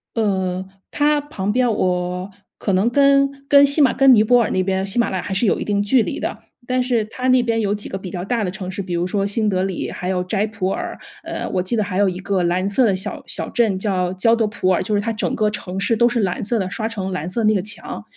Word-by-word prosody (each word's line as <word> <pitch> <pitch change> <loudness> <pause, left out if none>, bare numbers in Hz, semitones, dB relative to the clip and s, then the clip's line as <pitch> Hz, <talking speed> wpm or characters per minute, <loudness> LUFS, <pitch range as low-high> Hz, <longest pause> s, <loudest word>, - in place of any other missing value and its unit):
呃， 190 -4 -1 0.3
它 295 0 +2
旁 205 -9 -4
边 245 +1 +2
我 180 -1 -1 0.3
可 200 - -1
能 190 +5 +2
跟 275 +2 +4 0.2
跟 285 0 +7
喜 280 +2 +3
马 270 - +4
跟 270 -1 +6
尼 215 - +5
泊 245 +3 +4
尔 - - -2
那 185 - +1
边 190 0 -1
喜 195 +4 -1
马 235 - +2
拉 190 - -2
雅 - - -4
还 190 - -4
是 195 - +1
有 205 - +2
一 - - -3
定 205 -1 0
距 235 +4 +3
离 - - -4
的。 - - -3 0.3
但 255 +1 +1
是 245 -3 +1
它 250 +4 -4
那 255 -1 +5
边 230 -1 0
有 205 -2 0
几 205 - -5
个 190 - -4
比 190 -1 -8
较 175 0 -5
大 230 +2 -1
的 185 - -1
城 185 0 -6
市， 195 +2 -5
比 185 -2 -4
如 170 +1 0
说 195 +1 -1
新 210 +1 0
德 185 -1 0
里 190 -2 -3
还 180 - -5
有 180 -1 -1
斋 200 +3 0
普 215 -4 -3
尔， - - -4 0.3
呃， - - -5
我 185 -2 0
记 185 +6 -2
得 215 - +1
还 185 -1 -3
有 200 -1 +4
一 180 - -3
个 195 -1 -1
蓝 180 +2 0
色 220 +5 +2
的 195 -3 +2
小 185 - -3
小 - - -4
镇 220 -6 +1
叫 185 -3 -1
焦 225 +5 +3
德 225 -1 +1
普 210 -3 -2
尔， 185 - +2
就 215 - -2
是 205 - +2
它 225 +2 -2
整 215 - -2
个 215 -1 +1
城 190 -3 -6
市 215 +4 +1
都 235 +2 +4
是 240 -1 -1
蓝 190 -3 -1
色 230 +3 0
的， 190 -2 -2
刷 220 +4 -3
成 195 -4 -4
蓝 175 -2 -3
色 230 +6 -2
的 - - -2
那 215 - +3
个 195 - +1
墙。 210 +4 -5
205 Hz, 305 characters per minute, -20 LUFS, 185-230 Hz, 0.3 s, 跟